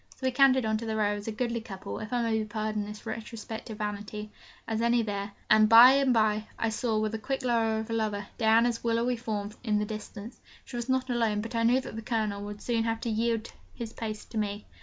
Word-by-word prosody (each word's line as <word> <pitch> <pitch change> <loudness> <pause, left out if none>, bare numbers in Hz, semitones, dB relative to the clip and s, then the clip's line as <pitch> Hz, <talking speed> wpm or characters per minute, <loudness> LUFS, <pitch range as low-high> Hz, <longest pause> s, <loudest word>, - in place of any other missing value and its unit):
So 260 - -7
we 260 - +3
cantered 260 -1 +5
on 220 0 +1
to 230 - -5
the 220 - -1
Row, 210 -1 +2
as 205 - -8
goodly 235 +2 -1
a - - -10
couple 195 -4 -7
(if 215 0 -7
I 245 -1 +1
may 225 -1 +1
be - - -1
pardoned 215 -1 -2
this 210 0 -9
retrospective 220 0 -6
vanity) 210 0 -5 0.4
as 225 0 -1
any 235 0 +3
there; 200 -1 -4
and 215 0 +6
by 235 +3 +10
and 275 -1 +3
by, 215 -2 +2
I 225 - 0
saw, 220 0 -1
with 215 0 0
the 225 - -3
quick 270 +3 -3
eye 225 -2 +2
of 220 0 -3
a - - 0
lover, 210 -2 -1
Diana's 230 +1 +3
willowy 235 +1 +1
form 215 -3 -3
in 215 -3 +1
the 210 - 0
distance. 215 +1 -8 0.3
She 250 - -9
was 240 +1 -4
not 260 0 +1
alone, 225 -3 +1
but 225 +3 -7
I 230 - +1
knew 245 +3 +4
that 260 - -8
the 225 - -4
Colonel 215 -3 -1
would 205 0 -8
soon 230 -2 +1
have 225 0 -1
to 235 - -2
yield 230 0 -1 0.2
his 230 -1 -6
place 215 -2 -5
to 225 - -4
me. 205 0 -3
220 Hz, 245 wpm, -29 LUFS, 215-235 Hz, 0.4 s, by